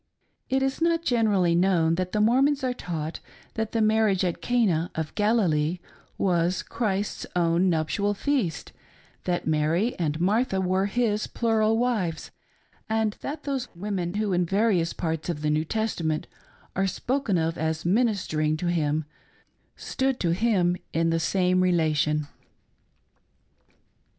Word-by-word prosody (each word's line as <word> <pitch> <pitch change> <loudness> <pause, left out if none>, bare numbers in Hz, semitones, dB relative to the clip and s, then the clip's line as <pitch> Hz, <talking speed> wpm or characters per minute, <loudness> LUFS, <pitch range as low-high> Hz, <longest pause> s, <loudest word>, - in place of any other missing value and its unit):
It 265 0 +1
is 270 +3 -1
not 335 0 +2
generally 210 - +2
knowa 175 -3 +3
that 185 +1 -2
the 215 - 0
Mormons 265 +6 +3
are 255 -1 0
taught 165 -8 -5 0.3
that 220 -1 -3
the 225 -1 +1
marriage 215 -3 +3
at 175 - -2
Cana 195 -9 +1
of 160 -1 -3
Galilee 180 -7 +1 0.4
was 175 -1 +1
Christ's 205 -3 -2
own 175 +1 +2
nuptial 180 +5 0
feast, 215 - -1 0.5
th^t 175 -1 -1
Mary 160 +9 +1
and 155 -2 -1
Martha 200 +3 +1
were 190 +1 +1
his 215 -1 0
plural 225 -1 +1
wives, 220 -9 -1 0.6
and 220 -1 0
that 295 +1 -5
those 270 -3 -2
women 185 -1 -3
who 210 -2 0
in 180 0 +2
various 195 -2 +1
parts 160 -1 -3
of 150 -3 -3
the 150 - +1
New 155 +1 +1
Testament 170 -6 -1 0.5
are 195 +1 +1
spoken 245 -1 -1
of 165 0 0
as 160 0 -2
ministering 180 -7 +1
to 175 +1 -1
him 155 -2 0 0.7
stood 265 -1 -2
to 170 - +1
him 180 -3 +2 0.2
in 165 +1 +1
the 165 - +1
same 185 +2 +2
relation. 155 -4 +1
185 Hz, 140 wpm, -26 LUFS, 165-220 Hz, 0.7 s, knowa